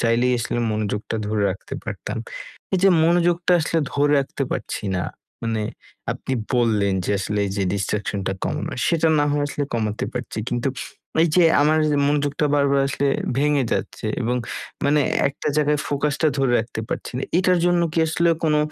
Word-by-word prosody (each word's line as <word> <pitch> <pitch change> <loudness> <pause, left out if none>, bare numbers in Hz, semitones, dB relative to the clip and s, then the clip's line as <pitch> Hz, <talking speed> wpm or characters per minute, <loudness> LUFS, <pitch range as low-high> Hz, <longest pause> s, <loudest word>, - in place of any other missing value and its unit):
চাইলেই 120 +2 +2
আসলে 120 0 -2
মনোযোগটা 105 +1 -2
ধরে 105 0 0
রাখতে 95 - -7
পারতাম। - - -5 0.6
এইযে 190 +1 +4 0.2
মনোযোগটা 175 +1 +3
আসলে 165 +1 0
ধরে 145 +1 +2
রাখতে 135 0 -2
পারছি - - -3
না, 90 - -1 0.4
মানে 115 -2 -1 0.5
আপনি - - -6 0.2
বললেন 110 -5 +2
যে - - -1
আসলে 105 +2 -2
এই - - -4
যে 100 - 0
ডিস্ট্রাকশন 100 0 -2
টা 95 - +1
কমানো - - -2 0.2
সেটা, 165 -1 +2
না 145 - +3
হয় 145 0 +1
আসলে 145 0 -2
কমাতে 110 -2 -1
পারছি, 120 -3 -5
কিন্তু 120 +3 -1 0.5
এইযে 170 +2 +4 0.2
আমার 155 +2 +4 0.3
মনোযোগটা 145 +1 +1
বারবার 140 -1 +3
আসলে 140 +1 -1 0.3
ভেঙে 145 -1 +2
যাচ্ছে - - -3 0.2
এবং 120 +2 0 0.5
মানে 145 +1 +4 0.3
একটা 140 +2 -4
জায়গায় 150 -1 +2
ফোকাসটা 145 +2 0
ধরে 135 -2 +2
রাখতে 110 0 -4
পারছি - - -4
না। - - -3 0.2
এটার 185 -1 +3
জন্য 175 0 +3
কি 170 - -1
আসলে 170 +2 +2 0.2
কোনো 150 -1 +3
140 Hz, 165 wpm, -22 LUFS, 115-150 Hz, 0.6 s, এইযে